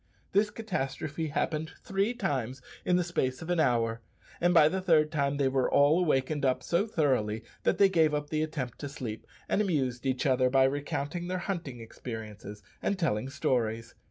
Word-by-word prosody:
This 205 Hz, +2 st, +3 dB
catastrophe 160 Hz, -7 st, -3 dB
happened 155 Hz, +1 st, -2 dB
three 195 Hz, +5 st, 0 dB
times 130 Hz, -, -2 dB, 0.3 s
in 180 Hz, -, +3 dB
the 180 Hz, -, +3 dB
space 130 Hz, -6 st, -1 dB
of 170 Hz, -, -4 dB
an 175 Hz, -, +1 dB
hour, 115 Hz, -5 st, +1 dB, 0.4 s
and 175 Hz, +1 st, +3 dB
by 165 Hz, -4 st, +7 dB
the 190 Hz, +4 st, -1 dB
third 155 Hz, -4 st, +3 dB
time 140 Hz, -2 st, 0 dB
they 140 Hz, -1 st, +2 dB
were 130 Hz, -1 st, +1 dB
all 145 Hz, +4 st, +5 dB
awakened 150 Hz, -3 st, +1 dB
up 130 Hz, -2 st, +1 dB
so 180 Hz, +6 st, +1 dB
thoroughly 125 Hz, -, 0 dB, 0.2 s
that -, -, +1 dB
they 200 Hz, -, +7 dB
gave 165 Hz, -5 st, +3 dB
up 150 Hz, 0 st, -4 dB
the 155 Hz, -1 st, +1 dB
attempt 145 Hz, -6 st, -4 dB
to 145 Hz, -, -5 dB
sleep, 120 Hz, -6 st, -6 dB, 0.2 s
and 210 Hz, -, +2 dB
amused 135 Hz, -, -1 dB
each 130 Hz, -1 st, 0 dB
other 130 Hz, -2 st, +3 dB
by 135 Hz, +1 st, +4 dB
recounting 145 Hz, +4 st, -2 dB
their 185 Hz, 0 st, -1 dB
hunting 170 Hz, -9 st, -4 dB
experiences 110 Hz, -3 st, -8 dB, 0.2 s
and 200 Hz, -, 0 dB
telling 130 Hz, -, 0 dB
stories. 115 Hz, -4 st, -1 dB
145 Hz, 185 wpm, -29 LUFS, 130-170 Hz, 0.4 s, by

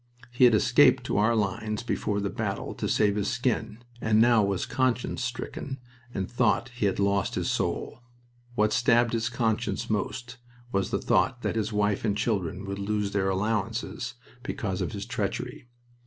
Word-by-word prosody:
He 125 Hz, +1 st, +5 dB
had 120 Hz, -3 st, +6 dB
escaped -, -, +5 dB
to -, -, 0 dB
our 115 Hz, +3 st, +3 dB
lines 105 Hz, +2 st, -1 dB
before 105 Hz, -3 st, -1 dB
the 100 Hz, -1 st, -2 dB
battle -, -, -3 dB
to -, -, -3 dB
save 100 Hz, -1 st, +3 dB
his 100 Hz, -1 st, 0 dB
skin, 120 Hz, -2 st, -1 dB, 0.2 s
and 110 Hz, 0 st, +3 dB
now 120 Hz, -1 st, +6 dB
was 100 Hz, -2 st, 0 dB
conscience 130 Hz, -1 st, 0 dB
stricken 130 Hz, +2 st, -4 dB, 0.3 s
and 95 Hz, -5 st, -3 dB
thought 120 Hz, +1 st, +1 dB
he 120 Hz, -4 st, -1 dB
had 95 Hz, -, -1 dB
lost 100 Hz, -1 st, +1 dB
his -, -, 0 dB
soul. -, -, -2 dB, 0.6 s
What 105 Hz, -1 st, +2 dB
stabbed 120 Hz, 0 st, +3 dB
his 115 Hz, 0 st, 0 dB
conscience 115 Hz, -2 st, -1 dB
most 120 Hz, +4 st, -3 dB, 0.3 s
was 100 Hz, -1 st, 0 dB
the -, -, 0 dB
thought 130 Hz, -2 st, +1 dB
that -, -, -1 dB
his 110 Hz, 0 st, -1 dB
wife 105 Hz, -1 st, +1 dB
and 105 Hz, -2 st, 0 dB
children 100 Hz, -4 st, -1 dB
would 100 Hz, 0 st, -4 dB
lose 105 Hz, 0 st, -1 dB
their 95 Hz, -1 st, +1 dB
allowances 110 Hz, +4 st, -2 dB, 0.3 s
because 100 Hz, -7 st, -3 dB
of -, -, -2 dB
his -, -, -4 dB
treachery. -, -, -4 dB
110 Hz, 170 wpm, -27 LUFS, 100-120 Hz, 0.6 s, had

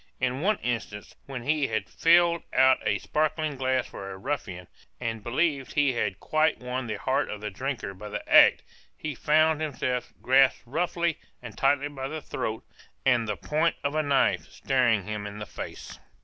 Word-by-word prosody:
In 130 Hz, +2 st, -1 dB
one 205 Hz, +4 st, +2 dB
instance, 110 Hz, -4 st, -4 dB
when 130 Hz, -3 st, -6 dB
he 145 Hz, +1 st, +1 dB
had 110 Hz, 0 st, -2 dB
filled 170 Hz, 0 st, +4 dB
out 130 Hz, 0 st, +5 dB
a -, -, +1 dB
sparkling 155 Hz, -1 st, -1 dB
glass 130 Hz, -1 st, 0 dB
for 95 Hz, -, -8 dB
a 95 Hz, -, -7 dB
ruffian, 95 Hz, -8 st, -4 dB, 0.3 s
and 115 Hz, -3 st, -4 dB
believed 135 Hz, +2 st, 0 dB
he 145 Hz, -3 st, +3 dB
had 105 Hz, -5 st, -2 dB
quite 155 Hz, 0 st, +1 dB
won 125 Hz, 0 st, -4 dB
the 110 Hz, -, -2 dB
heart 130 Hz, +6 st, 0 dB
of 105 Hz, -, -5 dB
the 105 Hz, 0 st, -5 dB
drinker 120 Hz, -2 st, -4 dB
by 105 Hz, +3 st, -9 dB
the 105 Hz, -, -6 dB
act, -, -, +7 dB, 0.3 s
he 155 Hz, -1 st, -4 dB
found 155 Hz, +3 st, +3 dB
himself 130 Hz, -5 st, -2 dB
grasped 130 Hz, +1 st, +4 dB
roughly 170 Hz, +4 st, -1 dB, 0.2 s
and 120 Hz, -3 st, -10 dB
tightly 140 Hz, +1 st, +2 dB
by 135 Hz, -2 st, -5 dB
the 155 Hz, +3 st, -5 dB
throat, 110 Hz, -6 st, -4 dB, 0.4 s
and 120 Hz, -3 st, +3 dB
the 105 Hz, -, -2 dB
point 155 Hz, +3 st, 0 dB
of 140 Hz, 0 st, -1 dB
a 155 Hz, -, +2 dB
knife 140 Hz, -2 st, +2 dB
staring 120 Hz, -6 st, +1 dB
him 105 Hz, -1 st, -4 dB
in 105 Hz, 0 st, -8 dB
the 105 Hz, -, -6 dB
face. -, -, -8 dB
130 Hz, 180 wpm, -27 LUFS, 115-150 Hz, 0.4 s, act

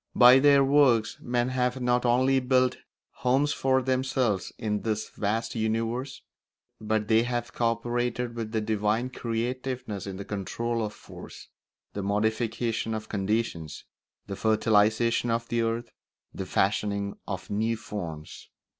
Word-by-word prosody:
By 125 Hz, +2 st, +8 dB
their 140 Hz, 0 st, +6 dB
works 135 Hz, -5 st, +3 dB
men 120 Hz, 0 st, 0 dB
have 125 Hz, 0 st, 0 dB
not 125 Hz, 0 st, +1 dB
only 130 Hz, +2 st, +3 dB
built 130 Hz, 0 st, +2 dB, 0.4 s
homes 135 Hz, +3 st, +2 dB
for 130 Hz, -1 st, +1 dB
themselves 130 Hz, -5 st, 0 dB
in 105 Hz, -2 st, -2 dB
this 110 Hz, -1 st, -2 dB
vast 110 Hz, +3 st, -2 dB
universe, 115 Hz, +4 st, -2 dB, 0.6 s
but 110 Hz, -1 st, -1 dB
they 110 Hz, +1 st, +4 dB
have 120 Hz, -1 st, -3 dB
co 115 Hz, -1 st, +2 dB
operated 120 Hz, +1 st, -2 dB
with 115 Hz, -2 st, -5 dB
the 110 Hz, -1 st, 0 dB
divine 110 Hz, +3 st, 0 dB
creativeness 120 Hz, -3 st, -3 dB
in 95 Hz, -1 st, -5 dB
the 100 Hz, -, -7 dB
control 115 Hz, +3 st, -2 dB
of 105 Hz, -, -3 dB
force, -, -, -12 dB, 0.4 s
the 100 Hz, -, -3 dB
modification 110 Hz, +2 st, -1 dB
of 110 Hz, 0 st, -6 dB
conditions, 100 Hz, -6 st, -2 dB, 0.4 s
the 100 Hz, -, -5 dB
fertilisation 110 Hz, +2 st, +2 dB
of 115 Hz, 0 st, -1 dB
the 120 Hz, 0 st, +1 dB
earth, 115 Hz, +1 st, -2 dB, 0.4 s
the 95 Hz, -, -5 dB
fashioning 100 Hz, 0 st, 0 dB
of 95 Hz, -3 st, -5 dB
new 110 Hz, +2 st, 0 dB
forms. 85 Hz, -8 st, -7 dB
115 Hz, 135 wpm, -27 LUFS, 105-125 Hz, 0.6 s, By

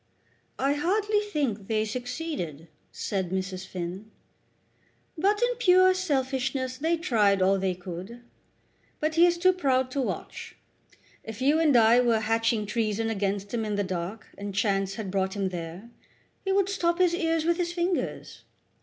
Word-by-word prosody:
"I 275 Hz, +2 st, +1 dB
hardly 415 Hz, +7 st, +1 dB
think 280 Hz, -, -2 dB
they 215 Hz, -1 st, +1 dB
succeeded," 245 Hz, -, -5 dB, 0.2 s
said 190 Hz, -3 st, -3 dB
Mrs. 185 Hz, 0 st, -3 dB
Finn. 185 Hz, +4 st, -6 dB, 1.1 s
"But 405 Hz, +7 st, +1 dB
in -, -, +2 dB
pure 370 Hz, -4 st, +5 dB
selfishness 265 Hz, -6 st, -1 dB
they 330 Hz, +3 st, +1 dB
tried 215 Hz, -, +2 dB
all 190 Hz, +1 st, +3 dB
they 190 Hz, -1 st, 0 dB
could. 185 Hz, +6 st, -8 dB, 0.8 s
But 310 Hz, +1 st, 0 dB
he 335 Hz, +2 st, +6 dB
is 345 Hz, 0 st, +1 dB
too 370 Hz, +2 st, +4 dB
proud 260 Hz, -7 st, +1 dB
to 275 Hz, -, -1 dB
watch. 255 Hz, -, -5 dB, 0.7 s
If 220 Hz, -1 st, -8 dB
you 285 Hz, +4 st, +3 dB
and 300 Hz, -6 st, +4 dB
I 230 Hz, +1 st, +6 dB
were 235 Hz, -3 st, +2 dB
hatching 225 Hz, 0 st, +1 dB
treason 225 Hz, +1 st, -1 dB
against 200 Hz, 0 st, -2 dB
him 230 Hz, -2 st, 0 dB
in 210 Hz, -1 st, -2 dB
the 205 Hz, -, 0 dB
dark, 185 Hz, +3 st, -4 dB
and 200 Hz, -1 st, -5 dB
chance 195 Hz, -1 st, 0 dB
had 200 Hz, -3 st, -5 dB
brought 190 Hz, 0 st, -1 dB
him 195 Hz, -2 st, -1 dB
there, 175 Hz, +5 st, -7 dB, 0.5 s
he 390 Hz, -, -1 dB
would 390 Hz, -1 st, +3 dB
stop 345 Hz, -3 st, 0 dB
his 360 Hz, -2 st, +3 dB
ears 325 Hz, -2 st, 0 dB
with 340 Hz, 0 st, +2 dB
his 345 Hz, -1 st, -1 dB
fingers. 350 Hz, +1 st, -2 dB
235 Hz, 160 wpm, -27 LUFS, 195-330 Hz, 1.1 s, he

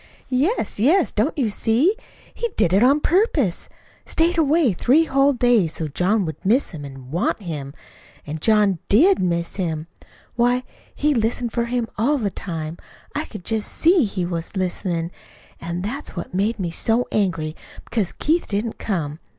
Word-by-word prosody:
"Yes, 295 Hz, -, 0 dB
yes! 320 Hz, -, +4 dB
Don't 230 Hz, +11 st, 0 dB
you 240 Hz, -7 st, +1 dB
see? 245 Hz, -, +2 dB, 0.4 s
He 470 Hz, -, -2 dB
did 175 Hz, -, +3 dB
it 195 Hz, -, +4 dB
on 275 Hz, +5 st, +4 dB
purpose 315 Hz, -, +1 dB, 0.3 s
stayed 335 Hz, +2 st, +1 dB
away 310 Hz, -, +3 dB
three 265 Hz, -, +3 dB
whole 275 Hz, -2 st, +3 dB
days, 240 Hz, -, +2 dB
so 160 Hz, -, -3 dB
John 185 Hz, +7 st, +1 dB
would 160 Hz, +2 st, -6 dB
miss 230 Hz, +8 st, +2 dB
him 155 Hz, -5 st, -8 dB
an' 135 Hz, -2 st, -10 dB
WANT 175 Hz, +9 st, 0 dB
him. 150 Hz, -6 st, -5 dB, 0.5 s
An' 150 Hz, +2 st, -5 dB
John 205 Hz, -1 st, +3 dB
DID 345 Hz, -, +5 dB
miss 170 Hz, -1 st, -1 dB
him. 160 Hz, -5 st, -2 dB, 0.5 s
Why, 245 Hz, +1 st, +2 dB, 0.3 s
he 300 Hz, +1 st, +2 dB
listened 235 Hz, 0 st, 0 dB
for 235 Hz, 0 st, 0 dB
him 240 Hz, -1 st, -1 dB
all 285 Hz, +7 st, +2 dB
the 210 Hz, -6 st, -1 dB
time. 165 Hz, -3 st, -5 dB, 0.4 s
I 300 Hz, +2 st, -2 dB
could 210 Hz, -6 st, -10 dB
just 220 Hz, -2 st, -1 dB
SEE 335 Hz, -4 st, +4 dB
he 190 Hz, -3 st, -2 dB
was 170 Hz, +2 st, -4 dB
listenin'. 180 Hz, -2 st, -2 dB, 0.5 s
An' 170 Hz, +2 st, -4 dB
that's 260 Hz, +6 st, -4 dB
what 175 Hz, -, -6 dB
made 205 Hz, +5 st, 0 dB
me 180 Hz, -4 st, -3 dB
so 225 Hz, +8 st, +1 dB
angry, 165 Hz, -6 st, 0 dB, 0.3 s
because 210 Hz, -7 st, -1 dB
Keith 330 Hz, +3 st, 0 dB
didn't 215 Hz, +2 st, -2 dB
come. 160 Hz, -7 st, -3 dB
215 Hz, 165 wpm, -22 LUFS, 175-265 Hz, 0.5 s, DID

